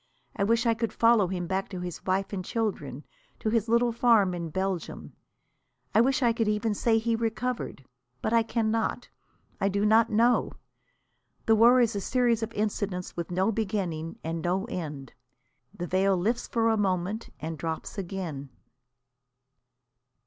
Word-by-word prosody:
I - - 0
wish 230 +4 +2
I 230 - +4
could 225 0 -2
follow 230 -4 +4
him 180 -1 -3
back 190 +2 -2
to 185 -3 -6
his 180 -1 -6
wife 190 +2 0
and 185 -2 -3
children, 155 - -3 0.3
to 215 - -2
his 225 -1 +1
little 235 +1 +3
farm 225 -5 +4
in 170 -2 -4
Belgium. 190 +1 -3 0.8
I 220 - +6
wish 265 +2 +2
I 235 -1 +4
could 225 -1 0
even 210 +1 +1
say 225 +2 +2
he 230 +1 +1
recovered. 225 - -3 0.3
But 220 - -2
I 230 - +5
cannot. 225 +1 -1 0.5
I 195 - +2
do 200 +1 0
not 220 +2 +5
know. 235 +3 +2 0.9
The 225 - +5
war 240 +3 +6
is 230 -2 +1
a 200 - -2
series 240 +1 +1
of 225 0 -3
incidents 205 -3 -2
with 170 -1 -4
no 185 +4 +1
beginning 190 -7 -3
and 165 +1 -3
no 185 +4 0
end. 150 - -6 0.6
The 185 -3 -5
veil 190 +1 +2
lifts 225 +7 -1
for 230 -1 +2
a 220 - +1
moment 195 +2 -1
and 160 +1 -4
drops 160 +5 -5
again. 170 -7 -5
210 Hz, 165 wpm, -27 LUFS, 180-230 Hz, 0.9 s, I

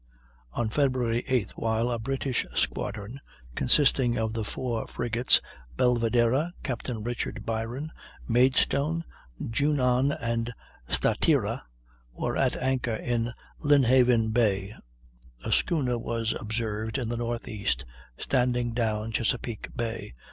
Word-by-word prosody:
On 115 - 0
Feb. 135 +3 +2
8th, 120 -1 0
while 115 +2 0
a 120 - -1
British 135 +1 -1
squadron, 105 +6 -2 0.3
consisting 125 - +3
of 110 0 -1
the 115 -1 -2
four 115 +2 -3
frigates 120 +1 +2 0.4
Belvidera 120 +6 +2
(Captain 125 -4 -3
Richard 120 +1 -3
Byron), 115 +7 -3 0.4
Maidstone, 140 +6 +3 0.4
Junon, 130 +1 +2
and 115 0 -2 0.3
Statira, - - +2 0.5
were - - -2
at - - +2
anchor 125 -3 0
in 120 +1 -1 0.3
Lynhaven 125 -5 +5
Bay, 105 -3 +2 0.7
a - - -2
schooner 130 -8 +2
was 115 -1 -1
observed 110 +1 -2
in 125 -4 -2
the 120 - -2
northeast 110 - -2 0.3
standing 125 -2 +1
down 110 -2 -1
Chesapeake 115 0 -1
Bay. 115 - -4
120 Hz, 110 wpm, -28 LUFS, 115-130 Hz, 0.7 s, Lynhaven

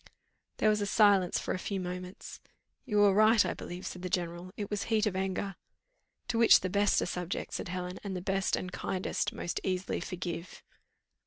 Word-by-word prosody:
There - - +2
was 210 -1 +1
silence 200 -5 +4
for - - -2
a - - -3
few 195 +1 -3
moments. 180 0 -6 0.5
"You 210 -5 +3
are 200 -1 +6
right, 215 +1 +5
I - - -1
believe," 180 +1 -7
said 180 - -6
the 180 - -4
general, 175 +1 -3
"it 205 -1 -4
was 205 -1 -1
heat 220 -1 +2
of 205 -3 -1
anger 190 0 -2 0.4
" - - -48
"To 230 - 0
which 230 - +7
the 185 - -2
best 200 +1 +3
are - - -1
subject," 180 0 -4
said - - -3
Helen, 180 0 -4
"and 195 -2 -4
the - - -2
best 190 +1 0
and 185 - -5
kindest 185 0 -2
most 175 - -3
easily 185 0 -1
forgive." 175 -2 -6
190 Hz, 195 wpm, -31 LUFS, 180-205 Hz, 0.5 s, which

